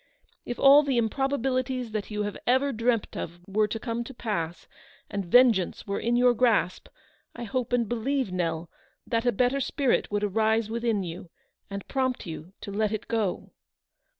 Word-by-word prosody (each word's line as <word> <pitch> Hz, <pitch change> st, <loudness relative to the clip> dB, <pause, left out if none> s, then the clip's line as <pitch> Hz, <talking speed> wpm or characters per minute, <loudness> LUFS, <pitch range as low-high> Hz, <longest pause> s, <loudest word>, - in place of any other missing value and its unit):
If 245 Hz, -, -3 dB
all 280 Hz, +2 st, +8 dB
the 275 Hz, -4 st, 0 dB
im 225 Hz, -2 st, +2 dB
probabilities 255 Hz, -2 st, -1 dB
that 215 Hz, -2 st, -3 dB
you 210 Hz, -1 st, -2 dB
have 205 Hz, -1 st, -4 dB
ever 260 Hz, +3 st, +3 dB
dreamt 230 Hz, -1 st, 0 dB
of 170 Hz, +1 st, -5 dB
were 210 Hz, +2 st, +1 dB
to 225 Hz, +2 st, -4 dB
come 230 Hz, +1 st, -3 dB
to 270 Hz, -, -10 dB
pass, 175 Hz, -8 st, -3 dB, 0.4 s
and 200 Hz, -1 st, -2 dB
vengeance 225 Hz, -3 st, +4 dB
were 200 Hz, -1 st, -2 dB
in 235 Hz, +1 st, 0 dB
your 245 Hz, 0 st, +5 dB
grasp, 230 Hz, -6 st, +1 dB, 0.5 s
I 235 Hz, -, -6 dB
hope 240 Hz, +2 st, -2 dB
and 240 Hz, -2 st, +2 dB
believe, 240 Hz, 0 st, -1 dB
Nell, 170 Hz, -2 st, -2 dB, 0.4 s
that 230 Hz, 0 st, -1 dB
a -, -, +5 dB
better 250 Hz, +5 st, +1 dB
spirit 270 Hz, -1 st, +1 dB
would 205 Hz, 0 st, -1 dB
arise 220 Hz, +2 st, +1 dB
within 230 Hz, -3 st, 0 dB
you, 175 Hz, 0 st, -7 dB, 0.4 s
and 200 Hz, -1 st, -6 dB
prompt 260 Hz, -2 st, -1 dB
you 165 Hz, +1 st, -8 dB
to 200 Hz, -, -6 dB
let 210 Hz, +1 st, 0 dB
it 215 Hz, -, -4 dB
go." 220 Hz, -5 st, -2 dB
230 Hz, 175 wpm, -27 LUFS, 200-250 Hz, 0.5 s, all